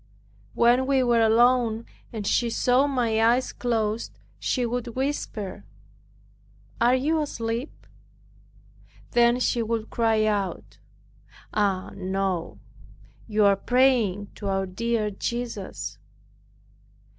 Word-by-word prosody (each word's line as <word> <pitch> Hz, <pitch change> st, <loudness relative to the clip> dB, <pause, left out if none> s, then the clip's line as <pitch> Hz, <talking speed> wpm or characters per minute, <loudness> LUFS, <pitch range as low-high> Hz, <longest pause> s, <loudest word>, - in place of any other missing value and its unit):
When 245 Hz, +2 st, +4 dB
we 270 Hz, -2 st, +3 dB
were 240 Hz, -2 st, +3 dB
alone 230 Hz, 0 st, +3 dB, 0.3 s
and 215 Hz, -3 st, -5 dB
she 235 Hz, +3 st, +1 dB
saw 250 Hz, +4 st, +2 dB
my 235 Hz, -5 st, +1 dB
eyes 240 Hz, +3 st, +2 dB
closed 225 Hz, -2 st, -2 dB, 0.2 s
she 250 Hz, -2 st, 0 dB
would 240 Hz, 0 st, -3 dB
whisper, 215 Hz, -8 st, -3 dB, 1.2 s
"Are 240 Hz, +2 st, +5 dB
you 310 Hz, +5 st, +1 dB
asleep?" 235 Hz, -2 st, -4 dB, 1.3 s
Then 240 Hz, +1 st, +4 dB
she 245 Hz, -1 st, +1 dB
would 225 Hz, -1 st, -3 dB
cry 225 Hz, -2 st, +2 dB
out, 205 Hz, -3 st, -2 dB, 0.7 s
"Ah 200 Hz, -3 st, 0 dB
no, 190 Hz, -, -2 dB, 0.7 s
you 215 Hz, -1 st, +2 dB
are 200 Hz, 0 st, +5 dB
praying 230 Hz, -4 st, +2 dB
to 205 Hz, -, -5 dB
our 195 Hz, 0 st, 0 dB
dear 215 Hz, +3 st, -1 dB
Jesus." 230 Hz, -1 st, -5 dB
230 Hz, 105 wpm, -25 LUFS, 205-245 Hz, 1.3 s, Are